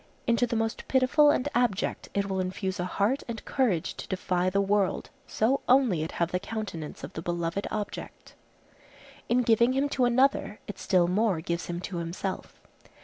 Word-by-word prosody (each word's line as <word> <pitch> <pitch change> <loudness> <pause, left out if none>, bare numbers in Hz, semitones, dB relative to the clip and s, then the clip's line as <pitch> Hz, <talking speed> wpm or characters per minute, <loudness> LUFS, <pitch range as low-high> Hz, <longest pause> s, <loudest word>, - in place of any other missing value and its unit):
Into 235 0 +2
the 235 - -2
most 225 0 -2
pitiful 265 +3 +4
and 285 -2 +2
abject 240 -5 0
it 200 0 +1
will 190 -1 -2
infuse 185 +1 -3
a 180 - 0
heart 210 +9 0
and 230 -2 -6
courage 220 - 0
to - - -7
defy 185 -1 0
the 195 +2 +1
world, 200 -1 +1 0.2
so 245 +6 +1
only 250 - +4
it 160 - -4
have 170 0 -1
the 180 - 0
countenance 200 -8 -6
of - - -7
the 160 - -5
beloved 175 +3 -2
object. 210 -1 -6 1.0
In 245 +1 +3
giving 235 +2 +4
him 275 +2 +1
to 255 -3 +2
another 245 -3 +2
it 205 - -8
still 180 -3 +3
more 195 -1 +1
gives 170 +1 -3
him 175 0 -3
to 185 -1 -5
himself. 170 +3 -5
200 Hz, 180 wpm, -28 LUFS, 180-240 Hz, 1.0 s, pitiful